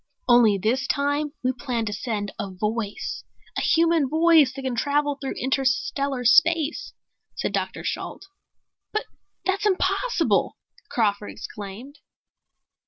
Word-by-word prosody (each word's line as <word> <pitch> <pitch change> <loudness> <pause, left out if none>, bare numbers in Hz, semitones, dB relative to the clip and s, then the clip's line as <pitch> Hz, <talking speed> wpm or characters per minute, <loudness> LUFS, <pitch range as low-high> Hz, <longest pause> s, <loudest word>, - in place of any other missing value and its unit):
"Only 240 -4 +6
this 240 +6 0
time 285 +2 0
we 255 - +2
plan 245 -3 -3
to 210 - -3
send 205 -2 -3
a 195 - -3
voice, 210 +2 -3 0.3
a - - -1
human 330 -4 +3
voice 320 -3 +5
that 270 0 -8
can 260 -1 -1
travel 290 +4 +1
through 270 - -3
interstellar 265 0 0
space," 320 - +3 0.4
said - - -2
Dr. - - -2
Shalt. - - -4 0.7
"But 430 - -2 0.4
that's 390 +2 +1
impossible!" 420 +5 +1 0.3
Crawford 205 -3 0
exclaimed. 210 +8 -9
265 Hz, 120 wpm, -24 LUFS, 225-305 Hz, 0.7 s, Only